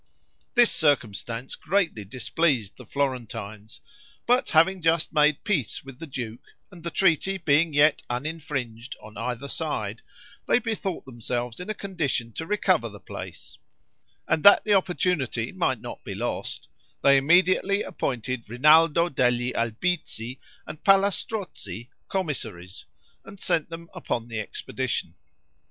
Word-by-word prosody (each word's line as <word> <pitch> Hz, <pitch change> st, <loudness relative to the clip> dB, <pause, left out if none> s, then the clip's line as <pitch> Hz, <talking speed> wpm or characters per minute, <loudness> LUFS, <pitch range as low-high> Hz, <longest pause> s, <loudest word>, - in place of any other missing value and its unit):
This 240 Hz, -2 st, +6 dB
circumstance 120 Hz, -4 st, 0 dB
greatly 165 Hz, -, 0 dB
displeased 125 Hz, -, 0 dB
the -, -, -13 dB
Florentines; 115 Hz, -6 st, -4 dB, 0.4 s
but 250 Hz, +2 st, +3 dB
having 180 Hz, +4 st, +4 dB
just 165 Hz, 0 st, +1 dB
made 150 Hz, -1 st, +3 dB
peace 145 Hz, -, -1 dB
with 135 Hz, -2 st, -12 dB
the 165 Hz, -, -7 dB
duke, 120 Hz, -4 st, -6 dB, 0.3 s
and 175 Hz, -3 st, -12 dB
the 170 Hz, -, -4 dB
treaty 190 Hz, +2 st, +2 dB
being 160 Hz, -1 st, +3 dB
yet 145 Hz, +1 st, +4 dB
uninfringed 130 Hz, -3 st, -4 dB
on 110 Hz, 0 st, -13 dB
either 125 Hz, +2 st, -4 dB
side, 115 Hz, -9 st, -3 dB, 0.5 s
they -, -, +5 dB
bethought 220 Hz, -6 st, -3 dB
themselves 120 Hz, -1 st, -4 dB
in 180 Hz, -, -7 dB
a 215 Hz, -, -1 dB
condition 155 Hz, -13 st, -2 dB
to 160 Hz, -, -5 dB
recover 185 Hz, -, +2 dB
the 105 Hz, -1 st, -12 dB
place; -, -, -9 dB, 0.7 s
and 155 Hz, -, +2 dB
that 200 Hz, -, +8 dB
the 210 Hz, -, +3 dB
opportunity 175 Hz, -, 0 dB
might 150 Hz, -10 st, 0 dB
not -, -, -8 dB
be -, -, -6 dB
lost, -, -, -4 dB, 0.4 s
they 140 Hz, 0 st, +7 dB
immediately 185 Hz, +7 st, +4 dB
appointed 125 Hz, -2 st, -3 dB
Rinaldo 155 Hz, +6 st, +5 dB
degli 125 Hz, -4 st, +1 dB
Albizzi 120 Hz, 0 st, -2 dB, 0.3 s
and 155 Hz, -, -9 dB
Palla 195 Hz, 0 st, +5 dB
Strozzi 185 Hz, -, -5 dB, 0.2 s
commissaries, 110 Hz, -, -4 dB, 0.4 s
and 200 Hz, -, -12 dB
sent 170 Hz, -4 st, +1 dB
them 165 Hz, 0 st, -8 dB
upon 120 Hz, 0 st, -3 dB
the 115 Hz, -1 st, -3 dB
expedition. 105 Hz, -, -3 dB
145 Hz, 135 wpm, -26 LUFS, 120-175 Hz, 0.7 s, that